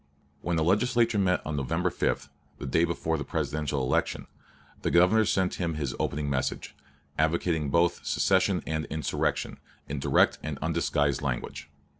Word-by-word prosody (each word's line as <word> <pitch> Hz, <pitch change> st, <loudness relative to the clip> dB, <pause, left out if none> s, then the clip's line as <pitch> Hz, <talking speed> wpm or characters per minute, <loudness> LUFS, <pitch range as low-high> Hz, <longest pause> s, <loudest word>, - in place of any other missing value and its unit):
When 85 Hz, -1 st, -1 dB
the 80 Hz, -, +2 dB
Legislature 115 Hz, +4 st, +2 dB
met 90 Hz, -2 st, +1 dB
on 75 Hz, -, -3 dB
November 80 Hz, +6 st, 0 dB
5 -, -, -1 dB, 0.3 s
(the -, -, -7 dB
day 80 Hz, +6 st, +2 dB
before 80 Hz, -1 st, -1 dB
the -, -, -2 dB
Presidential 75 Hz, -2 st, -2 dB
election) 65 Hz, -, 0 dB, 0.6 s
the -, -, 0 dB
Governor 90 Hz, +6 st, +5 dB
sent 95 Hz, -2 st, 0 dB
them 85 Hz, -3 st, -1 dB
his 70 Hz, -5 st, -2 dB
opening 75 Hz, 0 st, -1 dB
message, 70 Hz, -2 st, -2 dB, 0.4 s
advocating 80 Hz, -1 st, +1 dB
both 85 Hz, +4 st, +2 dB
secession -, -, +2 dB
and 80 Hz, 0 st, -2 dB
insurrection, 80 Hz, 0 st, -2 dB, 0.3 s
in 70 Hz, 0 st, -3 dB
direct -, -, +3 dB
and 75 Hz, -2 st, -4 dB
undisguised 75 Hz, -3 st, 0 dB
language. 65 Hz, -4 st, -4 dB
80 Hz, 150 wpm, -28 LUFS, 75-90 Hz, 0.6 s, Governor